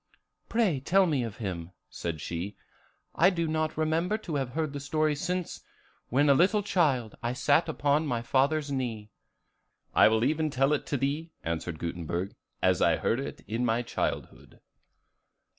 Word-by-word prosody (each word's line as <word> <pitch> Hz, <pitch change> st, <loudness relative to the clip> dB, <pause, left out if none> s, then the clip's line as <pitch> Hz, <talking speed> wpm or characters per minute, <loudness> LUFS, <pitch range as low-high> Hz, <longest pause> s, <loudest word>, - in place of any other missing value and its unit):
"Pray 210 Hz, -, +2 dB
tell 190 Hz, +8 st, +3 dB
me 150 Hz, -7 st, +1 dB
of 115 Hz, -3 st, -5 dB
him," 90 Hz, -5 st, -5 dB
said 85 Hz, -2 st, -5 dB
she; 85 Hz, +6 st, -4 dB, 0.6 s
"I -, -, +5 dB
do 170 Hz, -3 st, -1 dB
not 155 Hz, 0 st, -1 dB
remember 165 Hz, +6 st, +1 dB
to 185 Hz, -7 st, -7 dB
have 135 Hz, -3 st, -2 dB
heard 155 Hz, -2 st, -1 dB
the 145 Hz, -, -4 dB
story 155 Hz, +2 st, +1 dB
since, 180 Hz, +3 st, -3 dB, 0.5 s
when 140 Hz, +4 st, +3 dB
a 140 Hz, -, +7 dB
little 195 Hz, +8 st, +3 dB
child, 140 Hz, -, +1 dB
I 120 Hz, +1 st, -1 dB
sat 145 Hz, +5 st, +2 dB
upon 150 Hz, 0 st, +1 dB
my 120 Hz, -3 st, -1 dB
father's 140 Hz, +4 st, +1 dB
knee." 115 Hz, -6 st, -3 dB, 0.8 s
"I -, -, +7 dB
will 110 Hz, +1 st, +2 dB
even 155 Hz, +3 st, +1 dB
tell 135 Hz, +1 st, +2 dB
it 150 Hz, -, -2 dB
to 145 Hz, -, 0 dB
thee," 145 Hz, +5 st, -2 dB
answered 85 Hz, 0 st, -3 dB
Gutenberg, 85 Hz, +3 st, -3 dB, 0.3 s
"as -, -, +3 dB
I -, -, +4 dB
heard 115 Hz, -, 0 dB
it 135 Hz, -, -6 dB
in 115 Hz, +4 st, -1 dB
my 120 Hz, 0 st, +1 dB
childhood. -, -, -4 dB
140 Hz, 165 wpm, -29 LUFS, 115-155 Hz, 0.8 s, a